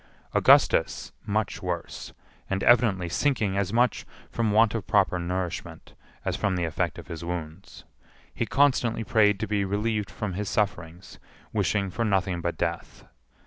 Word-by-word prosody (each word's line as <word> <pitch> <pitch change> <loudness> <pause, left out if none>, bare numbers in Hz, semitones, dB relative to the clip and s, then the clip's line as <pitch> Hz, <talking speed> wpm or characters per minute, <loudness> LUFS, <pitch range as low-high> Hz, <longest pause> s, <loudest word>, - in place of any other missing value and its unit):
Augustus - - +4 0.2
much 105 0 -1
worse, 90 -2 -5 0.4
and 95 0 -1
evidently 110 -7 +4
sinking 105 +1 0
as 100 -1 -1
much 120 +2 +2 0.3
from 115 -2 0
want 110 +1 +4
of 115 -4 -4
proper 95 -4 +2
nourishment 90 0 -5 0.3
as - - -1
from 100 -3 0
the 90 -1 -1
effect 80 - -2
of - - -9
his 85 0 -7
wounds. 85 -2 -7 0.5
He - - -2
constantly 125 -5 +2
prayed 105 -2 +3
to 110 - -1
be 100 -1 0
relieved 105 +1 -1
from 105 -4 -4
his 100 +2 -3
sufferings, 90 -4 -3 0.3
wishing 100 -2 0
for 115 - -2
nothing 95 -4 0
but 85 -1 -3
death. - - -4
100 Hz, 150 wpm, -26 LUFS, 90-110 Hz, 0.5 s, Augustus